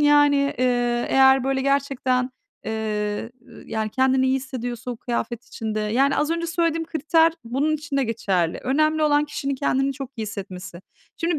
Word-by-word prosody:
yani, 290 -1 +4
eee, 245 -1 +1
eğer 265 -1 +5
böyle 270 0 0
gerçekten, 265 -2 0 0.3
eee, 215 0 -2 0.4
yani, 220 -1 -2
kendini 260 +2 +2
iyi 260 0 +2
hissediyorsa 250 -3 -5
o 245 - -5
kıyafet 235 0 -3
içinde, 220 -4 -4
yani, 255 +7 +2
az 300 - +1
önce 335 0 -1
söylediğim 330 -1 0
kriter 320 +1 +3
bunun 270 +7 0
için 290 -1 -5
de 275 - +2
geçerli. 190 -7 0
Önemli 310 +4 +2
olan 295 -1 +3
kişinin 280 -2 -3
kendini 270 0 0
çok 270 -1 -7
iyi 225 - -3
hissetmesi. 190 -4 -7 0.4
Şimdi 335 -1 0
265 Hz, 160 wpm, -23 LUFS, 230-290 Hz, 0.4 s, eğer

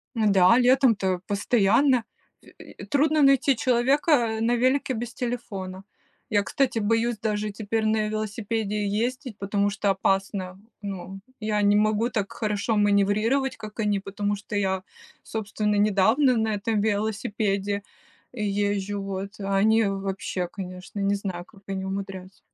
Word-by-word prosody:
Ну 220 -2 +2
да, 190 +4 +6
летом-то, 230 -8 +3
постоянно 230 +5 +3 0.4
ф - - -18
и - - -12
трудно 305 +1 +2
найти 275 0 +4
человека, 260 +6 +2
э, 230 -5 +3
на 240 +1 +2
велике 260 +2 +1
без 240 +1 -5
телефона. 195 -6 -5 0.5
Я, 205 -2 +2
кстати, 255 0 0
боюсь, 225 +2 +1
даже, 210 -1 -1
теперь 220 +2 -2
на 215 0 +1
велосипеде 215 -1 -2
ездить, 240 +3 -2
потому 200 0 0
что- 200 0 -1
опасно. 195 -1 -1 0.2
Ну, 195 -1 -6 0.2
я 215 -1 0
не 205 0 +4
могу 215 +3 +2
так 205 -4 -2
хорошо 215 0 -1
маневрировать, 210 +6 +2
как 215 0 -10
они, 205 -2 +1
потому 205 +1 -2
что 205 +1 -7
я, 190 -2 0 0.4
собственно, 210 -1 -2
недавно 215 +6 +3
на 220 -1 0
этом 210 +1 -1
велосипеде 205 -1 -1 0.5
езжу, 205 -2 -1
вот. 195 +2 -5
А 195 0 -1
они 220 +2 +4
вообще, 195 -2 -3
конечно, 185 +1 -8
не 200 +1 +1
знаю, 185 -3 -5
как 195 - -20
они 190 -1 -3
умудряются. 190 -1 -6
210 Hz, 140 wpm, -25 LUFS, 195-225 Hz, 0.5 s, да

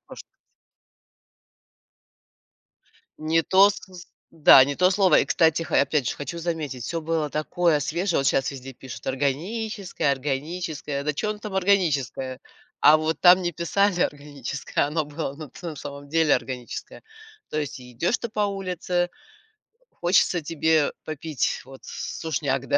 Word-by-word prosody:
можно - - -11
сказать. - - -55 2.8
Не 160 +1 +1
то 195 +4 +6
сыс 185 -3 -10 0.2
да 150 -5 +7
не 140 - -3
то 185 +5 +3
слово. 190 -3 +4
И, - - +1
кстати, 160 0 +2
ха, 160 - -1
я, - - +6
опять 140 -3 0
же, - - -3
хочу 145 +4 -6
заметить, 160 -7 -3
всё 165 +4 -3
было 160 -2 -1
такое 155 +1 +1
свежее. 170 +5 -1
Вот 135 - 0
щас 135 - +2
везде 135 -1 -9
пишут: 130 -1 -10
"органическое, 165 - -2
органическое". 145 +1 -3
Да 150 - 0
чё 210 +9 -2
оно 210 - -5
там 210 -2 -7
органическое? 150 - 0 0.4
А 150 +1 +7
вот 155 +1 -2
там 180 +1 +7
не 175 - -1
писали 180 +3 +1
"органическое", 145 -4 -2
а - - -2
оно 155 +1 -1
было, 145 -1 -5
ну, 155 -1 -9
ты 170 +7 -8
в - - -16
самом 140 0 -8
деле, 160 0 +3
органическое. 125 -2 -5 0.5
То 155 - -2
есть 145 -3 -5
и 125 -1 -13
идёшь 170 - 0
ты 235 - -4
по 215 -1 -4
улице, 180 -2 -2 0.8
хочется 175 0 +2
тебе 160 -1 +1
попить, 155 -2 -2
вот, 135 0 -13
с - - -6
сушняк, 140 -5 -1
155 Hz, 160 wpm, -24 LUFS, 140-175 Hz, 2.8 s, да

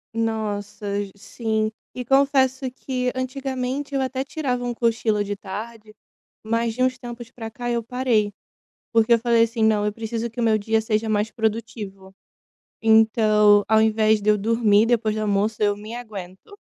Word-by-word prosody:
Nossa 210 -2 -3 0.3
sim. 220 +1 -2 0.2
E 250 -1 -5
confesso 270 -1 +2
que 250 -1 -3
antigamente 260 +1 -3
eu 270 - +1
até 260 0 -2
tirava 270 -4 -3
um 245 - -2
cochilo 225 -3 +1
de 205 0 -4
tarde, 215 +2 -8 0.5
mas 230 +1 0
de 255 - -2
uns 255 0 +2
tempos 240 -1 -9
para 225 -3 -8
cá 240 +2 -5
eu 235 -1 0
parei, 230 -3 0 0.6
porque 225 +1 +3
eu 230 - +4
falei 235 0 +3
assim: 230 0 -2
"Não, 215 -1 +3
eu - - 0
preciso 225 +1 -4
que 230 - -9
o 235 - +1
meu 220 -1 +4
dia 220 +2 +1
seja 220 0 -1
mais 215 +1 0
produtivo". 210 -4 -4 0.7
Então, 215 -2 +5
ao 220 0 +5
invés 220 -1 +3
de 210 - +1
eu 210 - +4
dormir 220 0 +3
depois 225 -2 +1
do 215 - -2
almoço, 210 +1 0
eu 205 -1 +2
me 215 +3 -8
aguento, 210 - -9
225 Hz, 170 wpm, -23 LUFS, 215-245 Hz, 0.7 s, Então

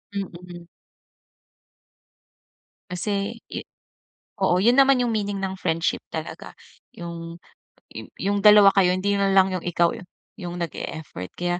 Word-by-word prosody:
Mm. 175 -3 -7 2.2
Kasi 200 +4 -2 0.2
it - - -6 0.7
oo, 180 -2 +3
yun 240 +3 +5
naman 270 -2 +5
yung 240 - 0
meaning 205 -2 -2
ng 190 0 -3
friendship 165 +1 -1
talaga. - - -7 0.4
Yung 170 -1 -7 0.6
yung - - -8
yung 200 +1 0
dalawa 210 -1 +8
kayo 185 -2 +4
hindi 200 +2 0
na 195 0 +2
lang 190 0 +5
yung 185 - -4
ikaw 170 -1 +2 0.5
yung 175 -2 -6
nag-e-effort. 155 - -6
Kaya 175 0 -1
185 Hz, 125 wpm, -24 LUFS, 175-200 Hz, 2.2 s, dalawa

